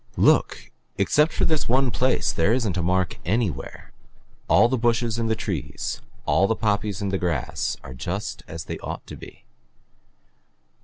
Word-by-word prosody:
"Look - - +3 0.3
except 150 +2 +3
for - - 0
this 155 -6 0
one 130 +1 +3
place 130 +2 +1
there 90 +7 +2
isn't 115 -7 0
a 90 - 0
mark 90 0 0
anywhere. 95 - -2 0.6
All 110 +4 +6
the 130 - 0
bushes 115 -1 +1
and 115 -1 0
the 110 - +2
trees, 95 - -4 0.2
all 100 - +3
the 115 - +1
poppies 105 -2 -1
and 100 - -1
the 95 - 0
grass 80 -8 -1
are 65 - -8
just 95 - -4
as 80 -1 -6
they - - -5
ought - - -6
to - - -9
be. - - -13
105 Hz, 165 wpm, -24 LUFS, 90-120 Hz, 0.6 s, All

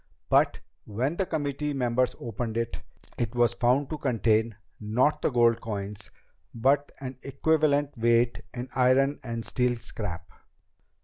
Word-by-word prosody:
But - - +3 0.3
when 125 +9 -1
the 195 - 0
committee 150 -2 -2
members 125 -1 +1
opened 115 0 -4
it, 115 0 -2 0.4
it 120 0 -2
was 120 -1 +3
found 125 +5 +1
to 155 - -3
contain, 115 -4 +1 0.2
not 115 +8 +1
the - - +2
gold 120 -3 +3
coins, 105 -2 -5 0.5
but 135 +5 +2
an 130 -2 -7
equivalent 145 0 +1
weight 120 0 +2
in 125 +1 -5
iron 135 +3 +3
and 115 -3 -4
steel 125 +3 +1
scrap." 90 -7 -5
120 Hz, 135 wpm, -27 LUFS, 115-140 Hz, 0.5 s, But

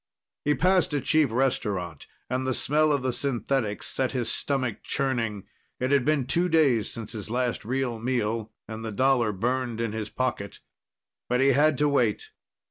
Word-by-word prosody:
He 150 0 +2
passed 180 -4 +2
a - - +2
cheap 155 0 +3
restaurant, 105 - -1 0.2
and 130 +1 -2
the 130 - +1
smell 155 +2 +2
of 140 -3 0
the 130 -1 0
synthetics 120 -3 -1
set 130 0 -1
his 125 -3 -1
stomach 130 -6 -1
churning. 115 -7 -1 0.4
It 130 +2 -1
had 140 -3 +3
been 150 -3 +2
two 175 +7 +1
days 140 -9 +3
since 115 -3 -6
his 110 -2 -6
last 125 0 -1
real 125 0 -2
meal, 115 -2 -1 0.2
and 110 0 -7
the 110 - -4
dollar 125 0 +2
burned 120 +3 -2
in 115 -2 -1
his 110 -1 -4
pocket. 120 -6 -3 0.7
But 125 0 +2
he 135 +1 +4
had 145 +2 +4
to 150 - +3
wait. 125 -7 +1
125 Hz, 175 wpm, -26 LUFS, 115-140 Hz, 0.7 s, he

